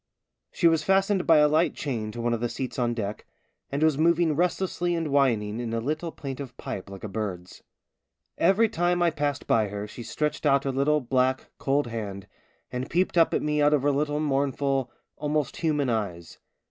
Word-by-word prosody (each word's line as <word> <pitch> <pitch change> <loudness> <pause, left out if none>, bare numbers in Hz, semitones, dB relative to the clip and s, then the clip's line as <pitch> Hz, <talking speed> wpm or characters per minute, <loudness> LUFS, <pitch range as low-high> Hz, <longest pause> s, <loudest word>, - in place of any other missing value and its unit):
She 170 - +3
was 165 -1 +3
fastened 195 +2 +2
by 165 - +7
a 150 0 +6
light 155 +3 +2
chain 115 -7 -3
to 120 - -6
one 120 0 0
of 115 - -1
the 120 +1 -1
seats 130 +1 -4
on 120 -1 0
deck, 105 -2 -4 0.5
and 140 +2 0
was 155 -2 +3
moving 165 -1 +3
restlessly 175 +1 0
and 165 -2 -2
whining 120 -6 +1
in 115 -1 -3
a - - 0
little 155 +7 -3
plaintive 135 -4 -7
pipe 95 - -6
like 100 -1 -10
a - - -3
bird's. 95 -4 -5 0.7
Every 215 +4 +4
time 175 -2 +1
I 170 - +3
passed 145 -2 -2
by 110 -2 +2
her 100 +1 -5
she 120 - -9
stretched 150 +5 -2
out 140 -2 +3
her 135 - -1
little, 145 +3 +2
black, 130 +1 0
cold 140 +1 +1
hand, 105 -4 -5 0.5
and 125 +1 -4
peeped 180 +3 +1
up 165 -2 +5
at - - 0
me 150 0 +1
out 145 +1 +5
of 140 - -1
her 145 - +3
little 145 +1 0
mournful, 135 -2 0 0.3
almost 150 -2 -1
human 150 -4 0
eyes. 100 -8 -3
140 Hz, 195 wpm, -26 LUFS, 120-155 Hz, 0.7 s, by